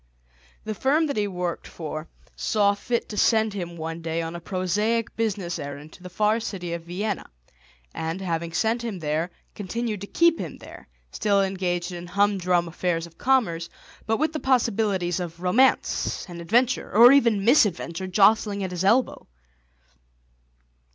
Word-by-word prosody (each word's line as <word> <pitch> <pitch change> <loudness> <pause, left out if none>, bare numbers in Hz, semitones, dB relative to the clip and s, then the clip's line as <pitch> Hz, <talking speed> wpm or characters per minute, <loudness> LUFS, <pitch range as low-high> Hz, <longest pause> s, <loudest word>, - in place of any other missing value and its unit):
The 215 - -3
firm 285 +9 +2
that 285 - -2
he 210 -1 0
worked 180 -3 -4
for 155 -1 -6 0.3
saw 205 -2 +2
fit 235 +4 -2
to 210 - -6
send 220 -1 +3
him 175 -3 -5
one 165 +1 -5
day 165 0 -2
on 165 +1 -5
a - - -5
prosaic 205 +6 -1
business 200 -6 -2
errand 145 +2 -8
to - - -15
the 180 - -9
far 210 +4 +1
city 180 -6 -5
of 170 -1 -6
Vienna, 195 +4 -3 0.6
and, 160 +3 -3
having 170 -3 -3
sent 225 +7 0
him 225 -5 -4
there, 160 +1 -1 0.2
continued 215 +1 -4
to 200 - -6
keep 335 +5 +3
him - - -6
there, - - -13 0.2
still 200 -2 +2
engaged 180 -2 -2
in 175 0 -7
humdrum 185 -2 +1
affairs 170 0 -2
of 165 -1 -17
commerce, 210 -11 +1 0.4
but 225 0 +2
with 315 +1 0
the 310 - -2
possibilities 210 - +1
of 170 -2 -6
romance 220 +9 +2
and 170 -1 -8
adventure, 240 +8 +1
or 235 +4 +8
even 230 -8 +3
misadventure, 190 - +2
jostling 200 +1 +3
at 185 - -3
his 180 0 -3
elbow. 235 +6 +2
195 Hz, 160 wpm, -25 LUFS, 170-220 Hz, 0.6 s, or